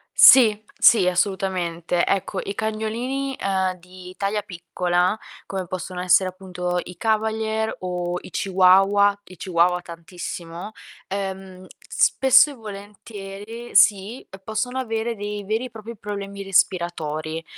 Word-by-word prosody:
Sì, 220 -5 +8 0.2
sì, 205 -6 +6
assolutamente. 180 -2 0
Ecco, 195 0 -1
i 200 - -5
cagnolini, 235 +6 -3
ehm, 190 -1 0
di 180 +1 -13
taglia 205 +1 -1
piccola, 180 +1 -1 0.3
come 190 -2 -5
possono 180 0 -5
essere 185 +1 +4
appunto 180 -1 -4
i 180 -1 -11
cavalier 220 +1 -1
o 180 -1 -3
i - - -12
chihuahua- 195 +2 +4
i 185 - -13
chihuahua 180 +1 +1
tantissimo- 170 +1 -8 0.4
ehm, 190 -1 -6 0.2
spesso 270 +3 +5
e - - -8
volentieri 205 +1 -9
sì, 200 +4 +4
uhm, 190 - -11
possono 225 +5 -2
avere 230 -1 -2
dei 205 0 -5
veri 220 +5 -1
e - - -7
propri 225 +1 -9
problemi 200 -1 -6
respiratori, 165 -4 -1
195 Hz, 125 wpm, -23 LUFS, 180-215 Hz, 0.4 s, Sì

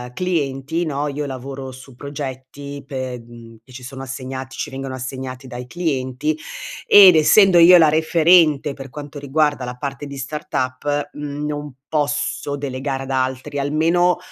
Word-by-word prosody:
clienti, 160 -2 -1
no, 145 -1 -2
io 145 0 -3
lavoro 135 0 -6
su 130 0 -13
progetti, 140 0 -7
pe 130 -2 -4
mhmm, 115 -1 -14
che 130 - -19
ci 125 - -10
sono 135 +1 -8
assegnati, 130 0 -6
ci - - -4
vengono 135 -1 -5
assegnati 130 0 -6
dai 125 -1 -8
clienti, 145 -3 -2 0.5
ed 190 -4 +9
essendo 180 +3 +6
io 180 +2 +9
la 160 -3 +6
referente, 160 -2 +4
per 135 0 -9
quanto 145 +2 -8
riguarda 145 -1 0
la 125 0 -6
parte 140 +2 -5
di 140 -1 -8
startup, 145 0 -3
mhmm, 145 0 -5
non 145 -2 -5
posso 145 -1 -1
delegare 135 0 -3
ad 135 - -6
altri, 130 +1 -2
almeno, 165 +5 +2
140 Hz, 150 wpm, -20 LUFS, 130-150 Hz, 0.5 s, ed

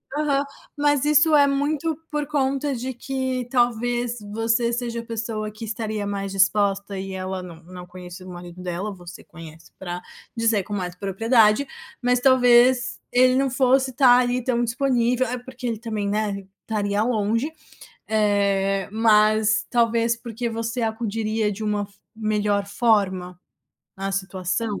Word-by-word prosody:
Aham, 285 -2 +1 0.3
mas 290 -1 +2
isso 300 +1 +5
é 285 -1 +6
muito 295 +3 -1
por 295 -1 -2
conta 275 -1 0
de 255 +2 -4
que 260 -1 -3
talvez 240 -1 0
você 225 +2 +1
seja 235 -1 -3
a 230 - -8
pessoa 220 -2 -3
que 215 +2 -8
estaria 215 -2 -3
mais 200 -1 -3
disposta 195 0 +1
e 195 0 -6
ela 185 0 -4
não 170 -2 -11
não 180 +1 -11
conheço 180 0 -10
o 185 - -10
marido 175 0 -10
dela, 180 +3 -4
você 175 -1 -11
conhece 165 -1 -13
pra 180 -1 -5 0.3
dizer 225 -3 +2
com 205 - -7
mais 180 -3 -3
propriedade, 215 +5 +3 0.3
mas 250 -1 +2
talvez 245 -1 +4
ele 255 +1 +4
não 270 0 +2
fosse 260 0 +2
tá 250 -1 +6
ali 250 0 0
tão 240 -2 +1
disponível 250 0 +1
é 250 +2 -3
porque 255 0 -10
ele 230 -3 -2
também, 215 -3 -3
né, 200 -1 -2 0.2
estaria 205 -2 -1
longe, 230 +4 0 0.6
eh, 200 -2 +1
mas 215 0 +3
talvez 230 -1 +2
porque 235 0 -5
você 230 +2 -3
acudiria 220 -1 -1
de 210 +2 -7
uma 210 -1 0
f 200 - -17 0.2
melhor 210 -2 0
forma 195 -5 +1 0.6
na 195 0 -3
situação. 195 +2 -2
225 Hz, 150 wpm, -23 LUFS, 200-245 Hz, 0.6 s, é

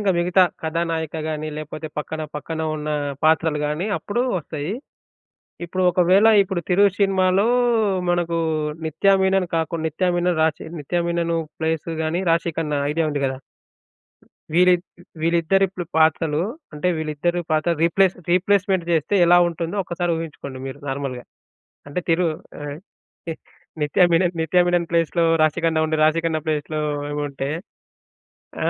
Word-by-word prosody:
ఇంక 205 -2 +2
మిగతా 180 +2 +4 0.2
కథానాయిక 160 -1 -2
గాని 155 0 -3
లేపోతే 155 +1 -6
పక్కన, 155 +1 -4
పక్కన 160 +2 -5 0.2
ఉన్న 150 0 -5 0.4
పాత్రలు 160 -1 +3
గాని 150 +6 -2
అప్పుడు 240 +4 -2 0.2
వస్తయి. 155 +2 -5 0.9
ఇప్పుడు 185 +2 -2
ఒకవేళ 185 +4 +4
ఇప్పుడు 190 -2 -2
'తిరు' 185 +3 +4 0.2
సినిమాలో 195 +1 +3 0.6
మనకు 175 -1 0 0.5
నిత్య 160 +5 -1
మీనన్ 190 -1 +2
కాకుండా 165 0 -2
నిత్య 180 +4 0
మీనన్, 175 -1 +1
రాశి 160 -2 -1
నిత్య 175 +5 -2
మీనన్ 170 0 0 0.3
ప్లేసు 160 0 -1
గాని 160 +3 -1
రాశి 170 +1 +2
కన్నా 150 -3 -1
ఐడియా 165 +1 0
ఉంది 145 -1 -2
కదా! 130 0 -2 1.2
వీరి 180 +1 +6 0.5
వీళ్ళిద్దరి 170 +4 +3
ప - - -5 0.2
పాత్రలు 160 -1 +3 0.3
అంటే 150 +5 -1
వీళ్ళిద్దరి 160 +3 -1
పాత్రలు 155 +2 +1
రీప్లేస్ 185 +2 +3 0.2
రీప్లేస్‌మెంట్ 190 0 +2
జేస్తే 160 +4 +1
ఎలా 175 +1 +6
ఉంటుందో 170 +3 -4
ఒక్కసారి 175 0 -2
ఊహించుకోండి. 145 -5 -7
మీరు 135 - -7
నార్మల్‌గా. 135 -2 -4 0.6
అంటే 145 - -2
తిరు 170 +1 +3 0.3
ఆ! - - -6 0.7
ఏ - - -1 0.5
నిత్య 150 +5 +3
మీనన్, 175 +1 +2
నిత్య 170 +3 +3
మీనన్ 175 -1 +1
ప్లేస్‌లో 170 0 +1 0.2
రాశికన్నా 160 +1 +1
ఉండి 155 0 0
రాశికన్నా 160 0 +1
ప్లేస్‌లో 155 0 -2 0.3
ఈమె 145 0 -2
ఉంటే 135 0 -4 1.2
ఆ! - - +4
165 Hz, 135 wpm, -22 LUFS, 155-180 Hz, 1.2 s, వీరి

